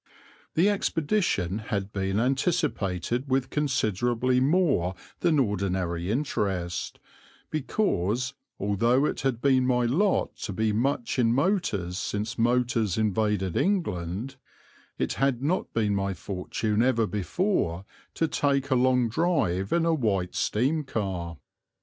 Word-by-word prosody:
The 170 +5 +4
expedition 160 - 0
had 100 -2 -3
been 95 +1 0
anticipated 130 - 0
with 130 0 0
considerably 125 -2 +1
more 135 - +2 0.2
than 165 -3 +2
ordinary 95 -7 -1
interest, 100 - -2 0.5
because, 130 - 0 0.3
although 115 +7 +2
it - - -2
had 130 -3 -1
been 130 -2 +4
my 125 -1 +2
lot 180 - +1
to 100 - -5
be 110 +2 0
much 125 +2 0
in 115 -2 +4
motors 120 - 0
since 105 +3 -3
motors 120 -4 +1
invaded 105 -3 0
England, 120 - -1 0.6
it - - -1
had 135 -2 +1
not 170 +6 0
been 105 -3 +1
my 100 -1 -1
fortune 105 +4 -2
ever 120 -2 +3
before 100 - -1 0.3
to 165 - +1
take 140 -2 0
a - - +5
long 125 -1 +3
drive 110 - 0
in 170 -1 +2
a 165 - +3
White 100 - 0
steam 140 +8 0
car. 95 - -3
115 Hz, 125 wpm, -27 LUFS, 100-140 Hz, 0.6 s, a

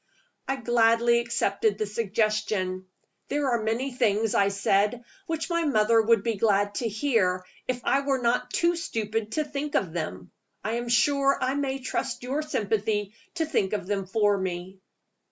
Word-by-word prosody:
I 270 - 0
gladly 235 -1 +3
accepted 220 -3 0
the 215 - -1
suggestion. 210 -3 -1 0.4
"There 285 -2 0
are 235 -2 +1
many 235 +5 -1
things," 225 -3 +1
I 200 - +4
said, 200 +4 +1 0.2
"which 325 -1 -2
my 335 0 +1
mother 225 -5 +4
would 225 -1 +3
be 230 -3 -1
glad 205 -1 +2
to 230 - 0
hear, 205 -6 +1 0.2
if 250 -1 -2
I 275 - +2
were 275 -1 0
not 245 0 0
too 340 +6 +2
stupid 225 - -3
to 310 - +1
think 290 0 -4
of 175 -5 0
them. 95 - -5 0.3
I 215 - -2
am 240 0 -4
sure 275 +3 +3
I 255 - 0
may 275 -1 -1
trust 255 -1 -3
your 270 +4 -1
sympathy 210 -6 -1 0.2
to 325 -2 0
think 200 -11 0
of 210 - -2
them 195 -1 -2
for 205 +1 +2
me." 185 0 -5
225 Hz, 170 wpm, -26 LUFS, 205-260 Hz, 0.4 s, I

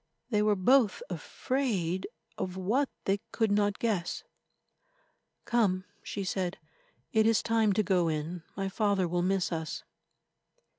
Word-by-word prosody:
They 210 -2 +3
were 210 0 +3
both 245 - +4
afraid 200 -10 -1 0.3
of 185 -2 -4
what 235 +10 +1 0.2
they 195 +1 +2
could 225 -3 +1
not 205 0 +2
guess. 205 -7 -1 1.2
"Come," 200 -6 +2 0.2
she 200 - -4
said, 185 -1 -2 0.6
"it 220 0 +5
is 225 -1 +3
time 225 -2 +3
to 215 - +2
go 180 -4 +2
in. 160 +2 -2 0.2
My 195 -1 -1
father 200 -2 +1
will 175 +1 0
miss 185 0 +1
us." 160 -2 -3
195 Hz, 135 wpm, -30 LUFS, 180-220 Hz, 1.2 s, it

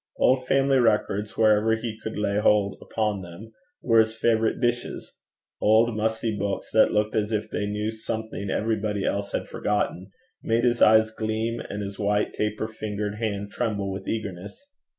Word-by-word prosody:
Old 130 0 +2
family 135 0 +3
records, 105 -2 +1
wherever 110 0 +4
he 110 -1 -5
could 110 0 -7
lay 105 -1 0
hold 105 -2 +3
upon 105 -3 -2
them, 90 +5 -11 0.3
were 115 -2 +4
his 110 0 +2
favourite 110 -1 +1
dishes; 120 -1 -2 0.5
old, 110 +2 +4
musty 110 0 -1
books, 100 -1 -3
that 110 - +5
looked 105 +1 0
as 105 0 0
if 110 0 -2
they 105 - -2
knew 105 +1 -2
something 110 -2 -5
everybody 105 -2 -1
else 100 0 -2
had - - -3
forgotten, 105 -2 -2 0.3
made 115 +1 +1
his 120 -1 +2
eyes 110 0 +6
gleam, 110 +1 -2
and 105 0 -5
his 100 0 -7
white 105 0 0
taper 105 +1 -2
fingered 105 -1 -4
hand 100 -3 -3
tremble 105 -5 -2
with 95 0 -6
eagerness. 100 - -5
110 Hz, 165 wpm, -25 LUFS, 105-110 Hz, 0.5 s, eyes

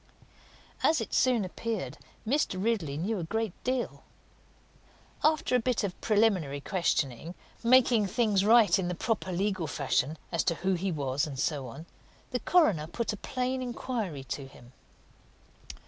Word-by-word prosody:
As 320 - +3
it 225 - -5
soon 245 -5 +3
appeared, 185 - -4 0.3
Mr. 265 -6 +1
Ridley 190 -10 0
knew 195 +6 -1
a - - -3
good 220 +3 -2
deal. 255 -1 -2 1.2
After 310 -4 +2
a - - +5
bit 245 -1 0
of 195 -3 -4
preliminary 200 -10 +2
questioning, 165 - -1 0.3
making 235 -3 +5
things 210 -2 +2
right 220 -1 +6
in 180 - -1
the 180 - -2
proper 210 0 -2
legal 190 -2 -1
fashion 145 +1 0
as 170 -3 +1
to 170 - +2
who 190 +3 0
he 185 +2 -1
was, 140 -2 -1
and 140 -3 -7
so 140 -1 -1
on, 140 +8 -9 0.5
the 250 - -1
coroner 215 - +3
put 230 +6 -2
a - - -3
plain 255 +3 -2
inquiry 235 - -4
to 135 +1 -5
him. 120 -2 -16
195 Hz, 150 wpm, -29 LUFS, 155-235 Hz, 1.2 s, right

